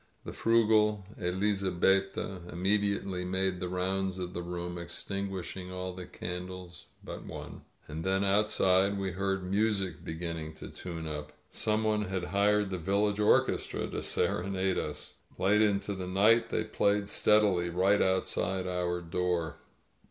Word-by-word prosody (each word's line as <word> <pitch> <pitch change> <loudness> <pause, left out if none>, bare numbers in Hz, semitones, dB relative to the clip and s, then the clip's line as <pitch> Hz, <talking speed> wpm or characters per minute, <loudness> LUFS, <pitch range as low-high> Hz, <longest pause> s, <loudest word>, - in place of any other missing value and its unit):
The - - -6
frugal 110 -3 +3
Elizabetta 95 0 +1
immediately 100 0 0
made 95 0 -1
the 90 -1 -3
rounds 95 +1 -1
of 90 -1 -4
the 85 - -3
room, 90 0 -4
extinguishing 95 +1 -4
all 90 0 -4
the 90 -1 -8
candles 90 0 -7 0.2
but - - -7
one. - - -8 0.3
And 80 +2 -5
then, 95 +1 +1
outside, 100 -1 +3
we 95 -1 -2
heard 95 +1 -1
music 100 0 0
beginning 80 -1 -5
to - - -9
tune 85 -3 -6
up. 75 -1 -5 0.2
Some 110 +1 +1
one 105 -1 +1
had 95 -2 -2
hired 105 0 +3
the 90 - -2
village 100 +4 +1
orchestra 105 - +2
to - - -3
sere - - +1
nade 95 0 0
us. 75 - -5 0.2
Late 105 +3 +3
into 100 -1 +2
the 95 -2 -5
night 105 +5 +4
they - - 0
played 100 0 +1
steadily, 105 -4 +3
right 95 +4 +3
outside 95 0 +1
our 90 -1 -1
door. 85 -2 -1
95 Hz, 145 wpm, -30 LUFS, 90-100 Hz, 0.3 s, night